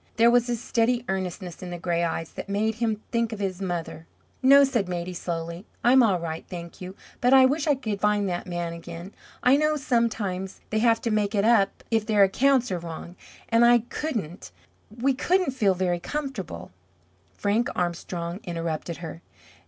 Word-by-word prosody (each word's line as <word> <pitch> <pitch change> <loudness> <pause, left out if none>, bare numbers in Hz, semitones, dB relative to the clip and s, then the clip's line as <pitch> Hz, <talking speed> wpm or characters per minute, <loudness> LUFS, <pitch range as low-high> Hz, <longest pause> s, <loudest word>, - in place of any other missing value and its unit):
There 235 +1 +5
was 245 0 +3
a 240 - +1
steady 235 +1 0
earnestness 185 -1 -4
in 180 - -6
the 175 - -5
gray 170 -1 -1
eyes 165 -1 -2
that - - -8
made 215 +2 +1
him 220 -2 0
think 230 -1 0
of 220 - -4
his 195 -2 -3
mother. 170 -3 -4 0.3
"No," 275 +2 +7
said 240 -9 0
Maidie, 175 0 -3
slowly. 170 0 -4 0.2
"I'm 255 +2 +6
all 200 -7 +3
right, 165 -1 -5
thank 170 -1 -8
you. 185 +1 -7 0.2
But 250 +2 +3
I 260 -1 +8
wish 290 +4 +1
I 290 - +4
could 215 -6 -4
find 210 -1 +2
that 175 0 -3
man 175 -1 -3
again. 170 +3 -9 0.3
I 255 +3 +6
know 305 +1 +2
sometimes 225 -8 -1
they 215 - +1
have 230 0 +3
to 230 - -1
make 210 0 0
it 200 0 +2
up 220 -4 +3
if 225 -1 +1
their 210 -2 +5
accounts 250 +4 +3
are 180 - -1
wrong, 170 +1 -8 0.3
and 230 +1 +4
I 240 0 +7
couldn't 215 - -4 0.4
we 245 +5 0
couldn't 350 +3 +1
feel 210 -7 +2
very 175 -1 0
comfortable 225 - -5 0.3
" 90 +1 -37
Frank 215 +4 +1
Armstrong 175 0 -3
interrupted 165 -1 -4
her. 165 +1 -8
200 Hz, 185 wpm, -25 LUFS, 175-235 Hz, 0.4 s, I